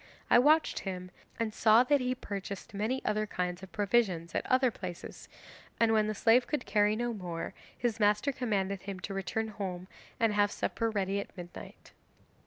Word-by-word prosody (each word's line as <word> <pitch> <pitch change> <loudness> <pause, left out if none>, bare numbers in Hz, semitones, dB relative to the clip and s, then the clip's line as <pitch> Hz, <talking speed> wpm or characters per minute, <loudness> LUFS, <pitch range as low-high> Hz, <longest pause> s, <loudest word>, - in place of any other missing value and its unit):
I - - +8
watched 305 +5 +4
him 185 -2 -5 0.3
and 225 -2 -1
saw 225 +2 +6
that 280 +2 +3
he 250 0 0
purchased 200 -2 -6
many 220 +6 -2
other 215 0 0
kinds 180 -2 -3
of 190 - -11
provisions 200 -6 +1
at - - 0
other 255 -1 +3
places, 180 -4 -8 0.5
and 230 -1 +4
when 215 -1 +3
the 215 - -2
slave 235 +4 +4
could 295 -5 -2
carry 205 +1 +3
no 240 +1 -1
more 175 -5 -5 0.2
his 235 -2 -1
master 210 +6 +3
commanded 200 -7 -1
him 195 -1 -6
to 195 - -5
return 220 +3 -2
home 185 -3 -5 0.3
and 225 -2 +3
have 205 0 +3
supper 230 -1 -1
ready 200 -2 -1
at 200 - -8
midnight. 175 -1 -10
210 Hz, 180 wpm, -31 LUFS, 195-230 Hz, 0.5 s, I